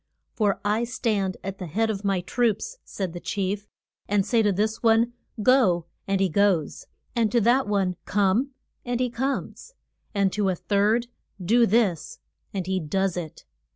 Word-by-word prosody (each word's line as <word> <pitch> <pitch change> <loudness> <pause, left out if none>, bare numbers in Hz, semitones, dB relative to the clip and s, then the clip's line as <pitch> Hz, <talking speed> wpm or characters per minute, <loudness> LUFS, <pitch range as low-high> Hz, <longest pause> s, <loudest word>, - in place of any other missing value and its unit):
For 205 -4 +1
I 215 +3 +1
stand 215 -6 -1
at 195 +1 -5
the 180 - -5
head 220 +7 0
of 200 -1 -5
my 195 -2 +1
troops, 245 - -1
said 190 -4 -4
the 175 - -6
chief, 200 +2 -3 0.4
and 200 -1 +2
say 230 +1 +3
to 210 -2 +3
this 215 +3 -1
one, 230 +1 +3 0.3
Go, 205 -10 +4 0.2
and 195 -1 +1
he 195 - +3
goes; 185 -3 +1 0.3
and 225 -3 +2
to 240 - +3
that 245 +4 +3
one, 195 -3 +1
Come, 205 +7 +2 0.3
and 245 0 -2
he 250 -1 0
comes; 275 - -3 0.4
and 195 -2 +2
to 205 -2 +1
a 185 - 0
third, 210 +6 +1 0.3
Do 230 +6 +3
this, 195 -7 +1 0.3
and 190 -3 -3
he 190 0 0
does 190 +3 -1
it. 170 -4 -7
205 Hz, 170 wpm, -25 LUFS, 190-230 Hz, 0.4 s, Go